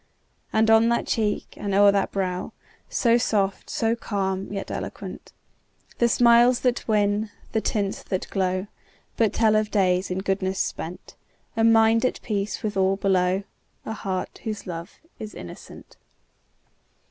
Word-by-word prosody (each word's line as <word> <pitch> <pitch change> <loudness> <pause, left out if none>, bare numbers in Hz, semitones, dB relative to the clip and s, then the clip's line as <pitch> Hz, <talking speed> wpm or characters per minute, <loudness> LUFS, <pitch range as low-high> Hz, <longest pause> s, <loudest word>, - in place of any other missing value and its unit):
And 220 0 +3
on 225 +1 +6
that 235 - +1
cheek, 210 -2 -1
and 200 -2 -2
o'er 200 0 +7
that 200 -1 0
brow, 185 -2 -2 0.4
So 235 -1 +3
soft, 200 -4 0
so 225 0 0
calm, 195 -4 -3
yet 195 -1 -5
eloquent, - - -7 0.7
The 235 - +4
smiles 240 +1 +5
that 250 -1 0
win, 210 0 +1 0.2
the 220 - 0
tints 200 -3 -1
that 185 - -3
glow, 185 -1 0 0.5
But 220 -3 +2
tell 220 -2 +3
of 215 0 +1
days 185 -3 +1
in 180 - -2
goodness 190 0 -1
spent, 175 0 -4 0.4
A 225 - +1
mind 225 0 +5
at 255 - 0
peace 205 -2 -2
with 210 -1 -2
all 190 0 +2
below, 190 -1 +1 0.4
A 220 - -3
heart 190 -4 -4
whose 215 -2 -4
love 170 0 -7 0.2
is 215 -1 -7
innocent! 85 - -11
205 Hz, 145 wpm, -24 LUFS, 190-225 Hz, 0.7 s, o'er